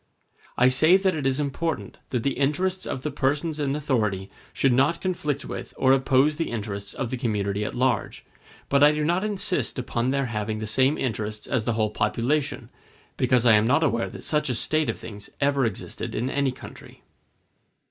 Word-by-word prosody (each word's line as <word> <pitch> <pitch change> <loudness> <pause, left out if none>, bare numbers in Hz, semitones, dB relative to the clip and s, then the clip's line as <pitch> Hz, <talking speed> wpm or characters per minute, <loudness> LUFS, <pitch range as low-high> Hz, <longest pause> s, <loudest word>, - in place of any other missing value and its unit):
I 125 - +5
say 155 +8 +6
that 190 -2 +1
it 145 -3 -1
is 135 +1 0
important 150 +3 -3
that 125 -3 -1
the 140 - +1
interests 180 +8 -1
of 130 - -4
the 150 - -2
persons 145 +3 -1
in 140 -1 0
authority 110 -10 -1 0.2
should 135 -2 +2
not 140 +7 +2
conflict 150 -6 -2
with - - -7
or 130 0 +4
oppose 135 +2 +3
the 165 - -2
interests 100 -3 -5
of 130 -4 -3
the 130 - -2
community 105 -3 -1
at - - -4
large; 125 -3 -1 0.4
but 140 0 +2
I 150 +1 +7
do 150 0 -1
not 175 +4 +1
insist 200 -6 -1
upon 120 -1 -1
their 140 0 +1
having 110 -2 -3
the 110 - -4
same 130 +7 +2
interests 110 -3 -3
as 115 -4 -1
the 120 - +1
whole 110 -1 0
population, 135 +7 -1 0.4
because 125 -2 +2
I 115 - +7
am 105 +1 +4
not 140 +6 +3
aware 115 -6 0
that - - -10
such 150 -2 0
a 125 - 0
state 155 +6 +1
of - - -2
things 105 -2 -9
ever 140 -2 +2
existed 110 -5 -4
in 125 +4 -1
any 140 -2 +1
country. 130 - -12
135 Hz, 195 wpm, -25 LUFS, 115-150 Hz, 0.4 s, I